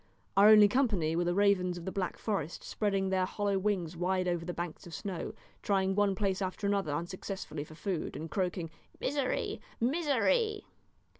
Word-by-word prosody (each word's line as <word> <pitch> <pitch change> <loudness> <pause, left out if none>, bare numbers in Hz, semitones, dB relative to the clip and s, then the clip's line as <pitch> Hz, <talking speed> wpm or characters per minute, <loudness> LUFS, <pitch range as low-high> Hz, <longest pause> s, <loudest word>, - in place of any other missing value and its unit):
Our 200 +2 +8
only 210 -1 +9
company 205 - +1
were 175 +1 +1
the 175 0 +1
ravens 190 -3 +3
of 170 - -8
the 190 - -3
Black 185 -2 -2
Forest 175 -7 -3
spreading 195 -2 0
their 185 -1 +1
hollow 200 -1 0
wings 185 -4 -1
wide 185 +1 0
over 175 -2 0
the 175 - -3
banks 175 +1 -6
of 170 - -7
snow, 190 -4 -5 0.3
trying 195 -2 +1
one 200 -1 +2
place 195 -1 0
after 190 +2 -3
another 200 -6 +1
unsuccessfully 175 0 -4
for 155 +1 -13
food, 175 +1 -3
and 160 - -5
croaking, 180 -2 -2 0.3
"Misery! 275 -1 -1 0.2
misery!" 345 - +1
190 Hz, 170 wpm, -31 LUFS, 175-205 Hz, 0.3 s, only